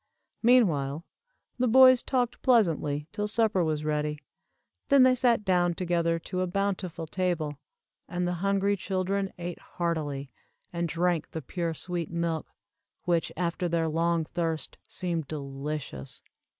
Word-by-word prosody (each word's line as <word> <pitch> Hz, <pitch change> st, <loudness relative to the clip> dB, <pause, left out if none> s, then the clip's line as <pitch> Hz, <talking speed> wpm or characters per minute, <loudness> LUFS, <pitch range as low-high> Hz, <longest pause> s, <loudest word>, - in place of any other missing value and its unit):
Meanwhile 170 Hz, -, +3 dB, 0.5 s
the 250 Hz, -, +3 dB
boys 255 Hz, +1 st, +7 dB
talked 245 Hz, -2 st, -1 dB
pleasantly 160 Hz, -, +2 dB
till 210 Hz, 0 st, -2 dB
supper 215 Hz, -4 st, +2 dB
was 155 Hz, -1 st, -1 dB
ready, 150 Hz, 0 st, -1 dB, 0.7 s
then 280 Hz, -2 st, +7 dB
they 255 Hz, 0 st, +6 dB
sat 240 Hz, -4 st, +2 dB
down 175 Hz, -2 st, +2 dB
together 170 Hz, -2 st, +1 dB
to 185 Hz, +3 st, -4 dB
a 185 Hz, -, 0 dB
bountiful 185 Hz, -3 st, -2 dB
table, 160 Hz, -4 st, -2 dB, 0.5 s
and 175 Hz, +1 st, -1 dB
the 180 Hz, -, 0 dB
hungry 200 Hz, 0 st, +2 dB
children 195 Hz, +1 st, -1 dB
ate 175 Hz, 0 st, -5 dB
heartily, 150 Hz, -5 st, -3 dB, 0.4 s
and 170 Hz, -1 st, -1 dB
drank 170 Hz, 0 st, 0 dB
the 160 Hz, -, -5 dB
pure 170 Hz, +3 st, -3 dB
sweet 175 Hz, 0 st, -4 dB
milk, 170 Hz, -2 st, -2 dB, 0.6 s
which 170 Hz, -2 st, +1 dB
after 175 Hz, 0 st, -1 dB
their 165 Hz, -1 st, +1 dB
long 165 Hz, +1 st, +1 dB
thirst 160 Hz, -3 st, -3 dB
seemed 170 Hz, -5 st, -2 dB
delicious. 140 Hz, -, -6 dB
175 Hz, 135 wpm, -28 LUFS, 160-195 Hz, 0.7 s, boys